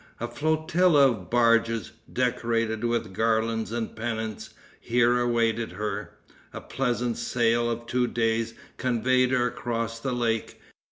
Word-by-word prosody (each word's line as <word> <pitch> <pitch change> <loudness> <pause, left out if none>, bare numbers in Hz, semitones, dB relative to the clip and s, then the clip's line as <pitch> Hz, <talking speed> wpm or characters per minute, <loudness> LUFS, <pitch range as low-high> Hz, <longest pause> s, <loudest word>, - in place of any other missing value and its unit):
A 120 - -2
flotilla 155 +2 +3
of 95 -6 -7
barges, 115 -1 +2 0.2
decorated 115 -2 0
with 120 -5 -1
garlands 110 +1 0
and 115 -1 -3
pennants, 110 -1 -4 0.2
here 120 0 +2
awaited 115 -3 0
her. 105 +1 -4 0.4
A - - -5
pleasant 120 -3 -2
sail 120 0 +1
of 120 0 -4
two 125 +1 0
days 115 -1 0 0.2
conveyed 125 +1 +2
her 125 -1 +2
across 115 -1 -3
the 130 +1 -2
lake. 115 -2 -1
115 Hz, 125 wpm, -26 LUFS, 115-120 Hz, 0.4 s, flotilla